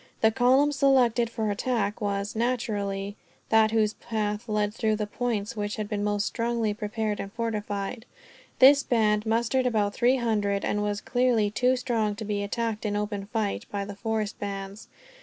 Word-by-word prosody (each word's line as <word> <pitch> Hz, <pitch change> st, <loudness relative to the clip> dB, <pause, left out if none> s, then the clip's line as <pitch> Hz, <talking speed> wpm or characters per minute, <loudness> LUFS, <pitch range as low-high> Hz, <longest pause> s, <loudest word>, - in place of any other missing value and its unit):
The 220 Hz, -, +5 dB
column 260 Hz, +5 st, +4 dB
selected 255 Hz, -5 st, +3 dB
for 220 Hz, -2 st, -2 dB
attack 210 Hz, -1 st, -1 dB
was, 200 Hz, 0 st, -2 dB
naturally, 205 Hz, -4 st, -2 dB, 0.3 s
that 220 Hz, -1 st, +5 dB
whose 215 Hz, -1 st, +2 dB
path 215 Hz, 0 st, -3 dB
led 210 Hz, -1 st, 0 dB
through 220 Hz, -1 st, 0 dB
the 210 Hz, 0 st, -2 dB
points 215 Hz, -1 st, -2 dB
which 205 Hz, -1 st, -3 dB
had 215 Hz, -2 st, -4 dB
been 205 Hz, -1 st, -2 dB
most 205 Hz, 0 st, 0 dB
strongly 230 Hz, -2 st, -1 dB
prepared 210 Hz, 0 st, -3 dB
and 200 Hz, -, -5 dB
fortified. 210 Hz, 0 st, -3 dB, 0.5 s
This 280 Hz, +2 st, +8 dB
band 215 Hz, -4 st, +1 dB
mustered 235 Hz, +3 st, +1 dB
about 210 Hz, -4 st, +1 dB
three 245 Hz, +2 st, +3 dB
hundred; 205 Hz, -4 st, 0 dB
and 210 Hz, -, 0 dB
was 205 Hz, 0 st, -2 dB
clearly 245 Hz, -4 st, +2 dB
too 250 Hz, +4 st, +2 dB
strong 230 Hz, -4 st, -1 dB
to 215 Hz, +1 st, -6 dB
be 205 Hz, -1 st, -1 dB
attacked, 220 Hz, +1 st, -2 dB
in 210 Hz, -2 st, -1 dB
open 205 Hz, -1 st, -3 dB
fight, 215 Hz, -2 st, -2 dB
by 200 Hz, -1 st, -2 dB
the 200 Hz, 0 st, -7 dB
forest 215 Hz, 0 st, -2 dB
bands. 200 Hz, 0 st, -6 dB
215 Hz, 170 wpm, -27 LUFS, 205-235 Hz, 0.5 s, This